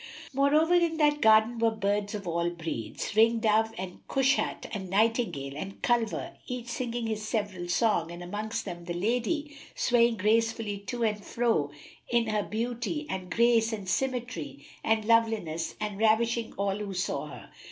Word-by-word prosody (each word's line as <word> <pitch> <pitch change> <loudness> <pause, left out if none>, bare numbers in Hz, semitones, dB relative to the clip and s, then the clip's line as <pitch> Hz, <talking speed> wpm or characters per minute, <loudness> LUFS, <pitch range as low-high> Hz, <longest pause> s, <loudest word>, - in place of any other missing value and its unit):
Moreover, 295 +5 +3
in 340 -2 +3
that 295 -1 +3
garden 220 +2 +5
were 230 0 +4
birds 205 -1 -1
of 200 -3 -6
all 170 0 0
breeds, 165 - -5
ring 230 +2 +5
dove 220 0 +2
and 185 0 -6
cushat 270 +1 +1
and 190 -3 -4
nightingale 200 - +1
and 190 +6 -6
culver, 240 +8 0
each 250 -2 -5
singing 240 -1 -3
his 220 -1 -2
several 205 -5 -3
song, 175 -4 +2
and 175 +1 -7
amongst 210 +5 -4
them 175 -3 -7
the 175 0 -4
lady, 250 - -1 0.2
swaying 235 -2 +3
gracefully 220 0 +1
to 240 +1 -2
and 210 -2 0
fro 225 -13 +1 0.4
in 235 -1 +2
her 210 -1 +1
beauty 240 +8 -3
and 185 -1 -4
grace 230 0 +3
and 205 -4 -5
symmetry 240 - -2 0.2
and 220 -1 +1
loveliness 220 -8 +1
and 210 -2 -4
ravishing 225 +1 +2
all 200 0 -1
who 205 -2 -5
saw 180 - -2
her. - - -11
220 Hz, 160 wpm, -28 LUFS, 195-235 Hz, 0.4 s, garden